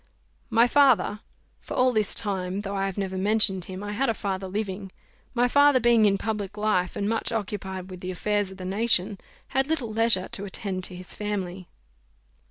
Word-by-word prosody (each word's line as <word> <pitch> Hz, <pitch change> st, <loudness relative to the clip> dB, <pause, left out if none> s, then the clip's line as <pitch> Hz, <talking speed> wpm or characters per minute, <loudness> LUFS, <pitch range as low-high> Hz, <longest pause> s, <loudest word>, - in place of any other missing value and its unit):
My 230 Hz, 0 st, +5 dB
father 245 Hz, -7 st, +4 dB, 0.4 s
for -, -, -7 dB
all 255 Hz, 0 st, +3 dB
this 215 Hz, -3 st, +1 dB
time, 190 Hz, -2 st, -2 dB
though 200 Hz, -1 st, -4 dB
I 195 Hz, 0 st, 0 dB
have 195 Hz, -, -5 dB
never 190 Hz, -1 st, -2 dB
mentioned 200 Hz, -2 st, +3 dB
him, 190 Hz, +1 st, -7 dB
I 205 Hz, -, -4 dB
had 260 Hz, +5 st, +1 dB
a 225 Hz, -, +1 dB
father 195 Hz, -1 st, -3 dB
living 195 Hz, -1 st, -4 dB, 0.4 s
my 245 Hz, +1 st, +3 dB
father, 285 Hz, +1 st, +5 dB
being 235 Hz, -2 st, +4 dB
in 195 Hz, -1 st, +3 dB
public 210 Hz, -1 st, -4 dB
life, 210 Hz, -4 st, 0 dB
and 200 Hz, -, -1 dB
much 225 Hz, +2 st, -1 dB
occupied 190 Hz, -4 st, -4 dB
with 180 Hz, -, -8 dB
the 185 Hz, -, -5 dB
affairs 205 Hz, +2 st, 0 dB
of 190 Hz, -, -11 dB
the 185 Hz, -, -7 dB
nation, 200 Hz, 0 st, +1 dB, 0.3 s
had 270 Hz, 0 st, +1 dB
little 275 Hz, -9 st, -2 dB
leisure 220 Hz, -4 st, +3 dB
to 200 Hz, -, -5 dB
attend 190 Hz, -1 st, -4 dB
to 180 Hz, -, -7 dB
his 180 Hz, 0 st, -5 dB
family. 190 Hz, -3 st, -4 dB
205 Hz, 190 wpm, -26 LUFS, 190-225 Hz, 0.4 s, My